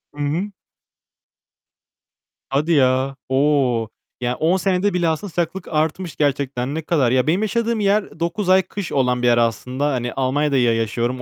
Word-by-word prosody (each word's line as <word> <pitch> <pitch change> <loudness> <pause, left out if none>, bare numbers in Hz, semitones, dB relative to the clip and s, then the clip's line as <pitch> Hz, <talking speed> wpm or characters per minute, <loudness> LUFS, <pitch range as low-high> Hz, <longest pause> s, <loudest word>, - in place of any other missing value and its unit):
Hı - - -17
hı. 170 +8 -2 2.0
Hadi 145 +5 0
ya. 130 -2 +2
O, 130 -4 +2 0.3
ya 125 0 -1
10 170 +4 +2
senede 190 +1 +1
bile 175 -2 +1
aslında 160 +6 -3
sıcaklık 175 +2 -3
artmış 160 +2 -2
gerçekten, 140 -2 -1
ne 160 - -2
kadar. 145 -6 +1
Ya, 130 +2 +2
benim 175 +6 +2
yaşadığım 230 +1 0
yer 205 +1 +2
ı 165 - -16
9 170 +3 -2
ay 190 0 +6
kış 190 -1 -6
olan 125 -2 +1
bir 125 - +2
yer 120 -1 +4
aslında. 125 +4 0
Hani, 120 -1 -2
Almanya'da 135 +2 0
ya 120 -2 +3
yaşıyorum, 120 +3 -2
145 Hz, 165 wpm, -20 LUFS, 130-175 Hz, 2.0 s, ay